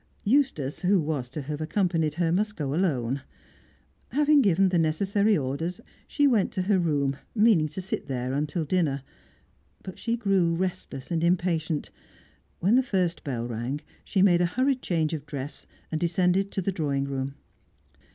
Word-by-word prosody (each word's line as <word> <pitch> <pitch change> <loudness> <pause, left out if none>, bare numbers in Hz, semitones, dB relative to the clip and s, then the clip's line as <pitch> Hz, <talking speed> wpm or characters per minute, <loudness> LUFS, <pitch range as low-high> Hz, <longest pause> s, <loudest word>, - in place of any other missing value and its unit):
Eustace, 210 - +1
who 190 +1 +3
was 145 -6 -2
to 140 +3 -5
have 150 +2 -5
accompanied 165 -2 0
her, 170 -1 +1
must 210 +4 0
go 140 -3 -2
alone. 140 -7 0 0.9
Having 295 0 +4
given 195 -3 +3
the 180 -2 +2
necessary 200 +6 +2
orders, 150 +8 -3 0.3
she 290 - +2
went 230 -8 +3
to 185 - -1
her 195 0 +2
room, 140 -5 0 0.2
meaning 210 -8 +4
to 155 +5 -6
sit 185 - -4
there 130 -1 -2
until 150 +3 -1
dinner. 145 -5 0 0.8
But 185 - -8
she 235 0 -1
grew 195 -6 +2
restless 175 -6 -4
and 165 -1 0
impatient; 170 -3 0 0.7
when 195 +6 +2
the - - +5
first 185 -8 -1
bell 120 -4 -3
rang, 120 +5 -3 0.2
she 195 -2 +1
made 175 -3 +5
a 175 - +3
hurried 255 +7 +1
change 160 -3 0
of 150 -2 -5
dress, 145 -1 -6 0.2
and 155 - -2
descended 180 +3 +2
to 190 - -1
the 195 - 0
drawing 145 -6 -1
room. 135 0 -3
170 Hz, 165 wpm, -27 LUFS, 145-195 Hz, 0.9 s, the